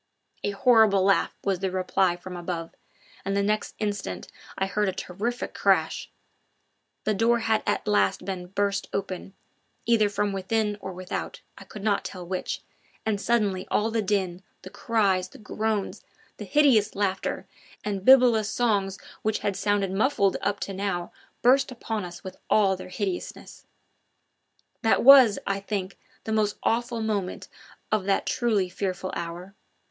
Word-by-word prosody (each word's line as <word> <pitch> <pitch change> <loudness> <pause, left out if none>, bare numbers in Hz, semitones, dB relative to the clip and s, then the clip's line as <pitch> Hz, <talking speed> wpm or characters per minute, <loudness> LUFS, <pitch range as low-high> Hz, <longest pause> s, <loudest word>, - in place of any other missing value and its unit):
A - - 0
horrible 210 -2 +4
laugh 195 0 +2
was 195 -2 0
the 190 0 -1
reply 185 -1 +1
from 180 +1 -9
above, 170 -1 -4 0.5
and 195 +1 -1
the 200 - +2
next 210 +1 -1
instant 205 -2 -3 0.3
I 195 - +1
heard 205 +1 0
a - - -3
terrific 215 +7 -4
crash; - - +1 0.9
the 215 - +1
door 230 +4 +3
had 220 -1 +1
at 205 +1 0
last 205 0 +2
been 185 -2 -4
burst 200 +1 -1
open, 195 0 -4 0.5
either 225 -3 +3
from 205 0 -1
within 210 +2 0
or 190 - -5
without, 185 0 -5
I - - -12
could 210 - -10
not 210 -2 +1
tell 180 -2 -7
which, 185 +1 -4 0.4
and 210 -2 0
suddenly 205 -5 +1
all 220 +2 +1
the 225 0 +1
din, 190 -3 -1 0.2
the 185 - -9
cries, 200 -5 +1
the - - -14
groans, 215 -1 -3 0.3
the - - -7
hideous 260 -9 +3
laughter 195 -2 -1 0.4
and 200 -2 -3
bibulous 245 -4 +6
songs 200 -5 0 0.2
which 215 0 0
had 200 - 0
sounded 200 -1 0
muffled 200 -1 +2
up 200 0 -1
to 195 - -3
now 190 -3 -3 0.3
burst 260 +2 +4
upon 225 -4 -4
us 175 -1 -10
with 190 - -8
all 195 -3 +4
their 185 - -9
hideousness. 185 0 -5 1.1
That 225 - +3
was, 260 -5 +9
I 195 0 -1
think, 195 -1 -4 0.2
the 220 - -4
most 210 -1 +1
awful 235 0 0
moment 205 -4 -2 0.4
of 215 -3 +1
that 195 0 +1
truly 220 -6 +1
fearful 185 0 -3
hour. 170 +3 -6
200 Hz, 155 wpm, -26 LUFS, 190-220 Hz, 1.1 s, was